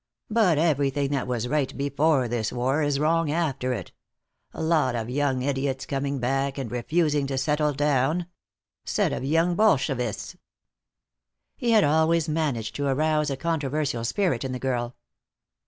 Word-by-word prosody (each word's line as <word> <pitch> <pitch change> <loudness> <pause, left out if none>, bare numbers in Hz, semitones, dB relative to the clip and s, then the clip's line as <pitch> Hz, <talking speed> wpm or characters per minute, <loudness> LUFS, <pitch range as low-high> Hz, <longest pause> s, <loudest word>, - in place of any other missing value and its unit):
But 210 -8 +3
everything 145 -3 +1
that 135 -3 -1
was 125 -1 -2
right 140 0 -1
before 140 -1 +1
this 115 -2 -2
war 130 +5 0
is 145 -2 +1
wrong 165 +1 +2
after 145 -5 -1
it. 125 - -4 0.6
Lot 160 -6 +1
of 115 +1 -3
young 135 -2 0
idiots 135 -1 -1
coming 140 0 -2
back 135 +2 -1
and 130 -5 -4
refusing 145 +3 0
to 135 -1 -3
settle 150 +3 +1
down. 145 +4 +1 0.6
Set - - 0
of - - -4
young 165 +5 +2
Bolshevists!" 135 - 0 1.2
He 240 - -2
had 220 -3 +5
always 160 +2 +2
managed 145 -9 -1
to 145 0 -1
arouse 150 +2 +1
a 135 - -3
controversial 150 -6 -1
spirit 140 - 0
in 130 -1 -3
the - - -3
girl. 120 -2 -2
140 Hz, 150 wpm, -25 LUFS, 130-155 Hz, 1.2 s, had